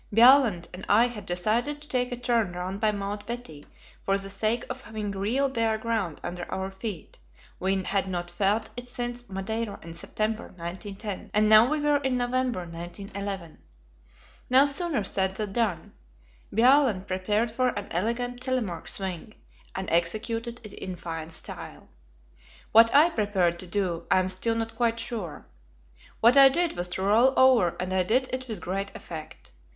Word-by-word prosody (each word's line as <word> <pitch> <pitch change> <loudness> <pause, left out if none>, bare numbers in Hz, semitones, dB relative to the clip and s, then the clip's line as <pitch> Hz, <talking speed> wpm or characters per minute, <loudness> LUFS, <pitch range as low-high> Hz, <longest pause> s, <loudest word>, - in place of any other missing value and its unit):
Bjaaland 230 -5 +6
and 180 +1 -8
I 220 +4 +6
had 220 -4 -9
decided 220 +11 0
to 295 - -13
take 250 -2 -1
a 245 - -3
turn 235 -6 0
round 185 +2 -4
by 215 -1 +2
Mount 205 0 -5
Betty 235 -12 -7 0.4
for 195 0 +1
the 195 0 -3
sake 215 +4 0
of 260 - -6
having 215 -3 -5
real 215 +8 0
bare 230 -4 0
ground 220 -8 -2
under 175 0 -6
our 190 0 -3
feet; 190 - -7 0.4
we 190 +1 0
had 195 0 0
not 175 -2 -4
felt 200 +5 0
it 245 0 -8
since 245 0 -4
Madeira 200 +2 -3
in 165 0 -9
September, 215 +5 -2
1910, 195 +4 -6
and 215 0 +4
now 215 +3 +7
we 305 0 0
were 295 0 +3
in 265 -3 -1
November, 245 -3 0
1911. 175 +1 -6 0.9
No 260 +2 +7
sooner 285 - 0
said 190 -1 0
than 210 -2 -4
done. 220 -7 -1 0.6
Bjaaland 240 -4 +4
prepared 205 +4 0
for 255 +3 +1
an 205 -4 -5
elegant 240 +7 -2
"Telemark 240 -11 -2
swing," 190 +2 -3 0.4
and 190 0 -4
executed 225 +8 0
it 215 - -10
in 185 -1 -6
fine 165 -2 -6
style. 165 - -7 0.8
What 225 +1 +7
I 310 +5 +6
prepared 190 - +1
to 185 - -6
do, 175 -3 -2
I - - +4
am 185 0 +1
still 225 +4 0
not 225 0 -3
quite 230 0 +1
sure. 225 -9 -5 0.8
What 235 +4 +6
I 275 -1 +10
did 340 +5 0
was 175 0 -3
to 185 +2 -3
roll 235 +7 +4
over, 255 -9 +5
and 185 +1 -2
I 190 - +3
did 250 +8 +1
it 255 0 -3
with 215 -6 -5
great 195 +2 -3
effect. 155 -2 -9
215 Hz, 170 wpm, -27 LUFS, 185-240 Hz, 0.9 s, I